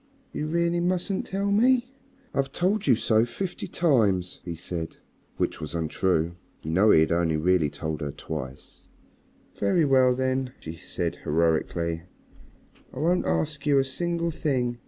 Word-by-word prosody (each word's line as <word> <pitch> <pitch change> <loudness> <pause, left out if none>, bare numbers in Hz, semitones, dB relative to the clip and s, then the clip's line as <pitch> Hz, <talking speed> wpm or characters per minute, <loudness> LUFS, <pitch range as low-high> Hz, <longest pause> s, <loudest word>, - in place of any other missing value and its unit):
"You 150 - -3
really 170 +1 +1
mustn't 180 +2 -1
tell 200 +1 -1
me?" 250 +4 +3 0.4
"I've 135 0 0
told 190 +4 0
you 125 - +6
so 110 0 +3
fifty 175 +10 -4
times," 105 - +2
he 85 -2 -5
said. 85 0 -5 0.4
Which - - -1
was 75 +2 -5
untrue. 85 +1 0 0.3
You 80 - -3
know 95 +6 +4
he 80 - +7
had 80 - +2
really 85 -1 +2
only 90 -5 +3
told 80 +2 -4
her 75 - -2
twice. 70 -3 -8 0.7
"Very 125 - +3
well, 130 -2 +4
then," 130 0 -1
she 80 +1 -7
said - - -3
heroically, 80 +1 0 0.9
"I - - -12
won't 170 +6 +1
ask 150 -1 -1
you 145 -1 +4
a 135 - +3
single 170 +5 -1
thing. 125 -6 -1
125 Hz, 155 wpm, -26 LUFS, -, 0.9 s, he